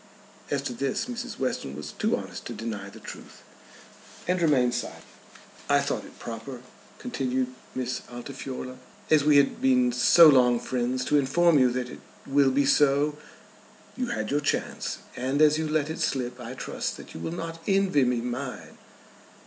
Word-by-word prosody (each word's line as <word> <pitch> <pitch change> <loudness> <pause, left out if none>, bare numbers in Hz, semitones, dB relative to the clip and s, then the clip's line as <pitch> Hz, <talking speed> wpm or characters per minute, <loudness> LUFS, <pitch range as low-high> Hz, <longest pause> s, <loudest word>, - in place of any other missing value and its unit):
As 140 -1 -1
to 125 - -3
this 135 - -1
Mrs. 245 0 -6
Western 125 - -2
was 75 - -7
too - - 0
honest - - -7
to - - -5
deny 105 -3 -5
the - - -13
truth, - - -11 0.8
and 180 0 +1
remained 130 -7 +3
silent. 120 - -4 0.7
"I - - +5
thought - - -2
it - - -15
proper," 120 +2 -7 0.4
continued 130 - -2 0.2
Miss 130 0 -2
Altifiorla, 130 +1 -7 0.3
"as 155 -2 +5
we 150 -1 +5
had 140 -1 +3
been 125 -2 +4
so 160 +7 +7
long 125 -4 +5
friends, 125 +1 -1
to 150 - +3
inform 155 +3 +4
you 130 -1 +5
that 125 0 -3
it - - -10 0.3
will 140 0 +4
be 140 +2 +2
so. 145 +1 +3 0.8
You 255 -1 -2
had 240 - -3
your 145 +1 +1
chance, 145 - -2 0.2
and 130 +3 -1
as 155 0 +5
you 160 - -1
let 155 -1 +1
it 160 - -6
slip 125 -2 -1
I 125 +1 -7
trust - - -4
that - - -12
you - - -8
will 120 - -4
not 165 -1 -5
envy 195 -7 +3
me 125 -1 +1
mine." 125 +2 -6
135 Hz, 175 wpm, -27 LUFS, 125-150 Hz, 0.8 s, so